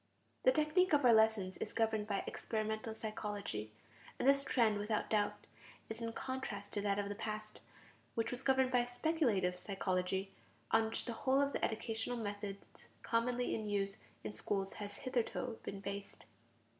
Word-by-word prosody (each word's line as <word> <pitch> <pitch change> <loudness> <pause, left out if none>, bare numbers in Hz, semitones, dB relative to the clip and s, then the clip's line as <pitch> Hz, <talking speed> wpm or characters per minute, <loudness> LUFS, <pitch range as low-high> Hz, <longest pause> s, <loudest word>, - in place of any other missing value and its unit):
The 255 - +8
technique 310 +6 +3
of 290 -3 +5
our 240 - +8
lessons 220 -4 +4
is - - -4
governed 220 -2 +1
by 200 -2 0
experimental 220 0 -2
psychology. 205 - -4 0.5
And 255 - 0
this 275 0 +6
trend, 225 -6 +3
without 210 +1 -1
doubt, 210 -1 +1 0.4
is 220 +1 -4
in 230 0 -2
contrast 260 -7 -4
to 205 - 0
that 200 -1 +1
of 205 -1 0
the 205 - -2
past, 215 0 -5 0.5
which 230 - 0
was 250 +1 -3
governed 265 -1 +3
by 245 -1 +4
speculative 245 - +1
psychology, 190 0 -1 0.4
on 225 0 +5
which 220 - -2
the 235 - -2
whole 260 +4 +2
of 280 0 +2
the - - -2
educational 225 +2 -1
methods 205 -2 -6 0.2
commonly 245 +1 +1
in 220 -1 -2
use 200 -1 0 0.3
in 110 -1 -4
schools 195 - -1
has 205 -1 -5
hitherto 245 -1 -2
been 195 0 -5
based. 200 - -6
220 Hz, 165 wpm, -36 LUFS, 200-245 Hz, 0.5 s, The